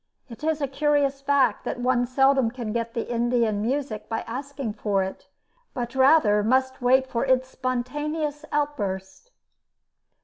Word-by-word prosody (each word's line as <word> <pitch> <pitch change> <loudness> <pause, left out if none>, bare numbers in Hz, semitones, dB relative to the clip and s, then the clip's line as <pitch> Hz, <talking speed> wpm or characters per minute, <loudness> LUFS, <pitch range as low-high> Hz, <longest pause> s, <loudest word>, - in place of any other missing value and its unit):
It 230 +4 -11
is 315 -1 0
a 280 - +1
curious 280 0 +1
fact 275 -6 +2
that - - -4
one 245 0 +1
seldom 270 -1 +3
can 230 -3 -5
get 230 -1 -3
the 230 - -2
Indian 235 -3 +1
music 245 -2 -3
by 225 - -2
asking 270 -1 -5
for 205 -2 0
it, 190 - -7 0.5
but 240 0 -4
rather 265 -6 +5
must 260 +3 +1
wait 260 +2 +4
for 235 -3 -2
its 260 -1 +2
spontaneous 295 +4 -3
outburst. 210 - -3
255 Hz, 145 wpm, -25 LUFS, 230-280 Hz, 0.5 s, rather